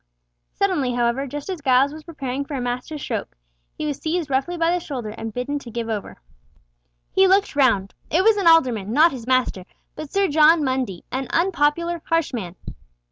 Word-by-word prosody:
Suddenly, 315 -11 0
however, 240 +3 0
just 290 +2 -6
as 370 -5 -5
Giles 270 +1 +3
was 310 0 -10
preparing 275 -5 -4
for 280 +1 -6
a - - -2
master 245 +5 -4
stroke, 225 - -5 0.4
he 310 - -3
was 290 -3 -3
seized 320 -2 -2
roughly 275 +7 0
by 330 0 +2
the 355 - +1
shoulder 260 -10 -5
and 225 +1 -6
bidden 250 +6 -3
to 250 - -11
give 230 0 -4
over. 215 -3 -4 0.9
He 385 0 +4
looked 390 -2 +2
round. 230 -9 +2 0.2
It 345 +4 +2
was 445 +1 +5
an 395 -4 0
alderman, 245 -11 +4
not 315 +5 +5
his 245 -3 -8
master, 255 -7 +1 0.3
but 310 -2 -8
Sir 395 0 +2
John 310 +1 +5
Mundy, 260 -9 -2
an 260 0 -3
unpopular, 340 -1 +1
harsh 330 -4 0
man. 185 -7 -5
280 Hz, 190 wpm, -22 LUFS, 245-330 Hz, 0.9 s, was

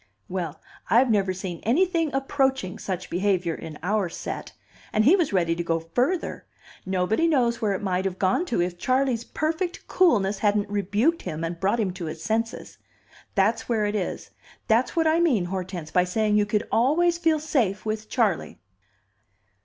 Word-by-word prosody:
"Well, 175 -5 -4 0.3
I've 235 +5 +4
never 195 -3 +2
seen 185 -2 -5
anything 330 - +1
approaching 265 -7 0
such 185 -2 -4
behavior 180 -2 +1
in 160 -2 -8
our 200 -1 0
set. - - -6 0.4
And 215 0 +2
he 320 +9 +7
was 345 -7 +1
ready 170 -4 +2
to 170 - -3
go 165 -1 0
further. 245 - -2 0.4
Nobody 190 - +1
knows 245 -7 +2
where 210 -3 +1
it 195 - -4
might 185 -1 0
have 190 -1 -2
gone 195 - +1
to, 235 - -1
if 175 0 -4
Charley's 255 0 +1
perfect 330 +7 -3
coolness 210 - +3
hadn't 205 -1 +1
rebuked 205 - +1
him 155 +1 -5
and 165 +1 -4
brought 200 +6 +1
him 195 -5 0
to 180 -2 -6
his 160 0 -6
senses. 225 +2 -2 0.6
There's 210 +3 +2
where 220 -3 +1
it 205 - -1
is, 200 -4 -3 0.4
that's 230 +3 +2
what 330 -1 +2
I 320 +1 +3
mean, 265 - +2
Hortense, 180 -3 -5
by 180 0 +3
saying 210 +3 +1
you 210 0 +3
could 210 +1 0
always 335 +8 +3
feel 320 -2 +2
safe 230 -11 0
with 215 0 -3
Charley." 220 -9 0
210 Hz, 175 wpm, -25 LUFS, 185-265 Hz, 0.6 s, he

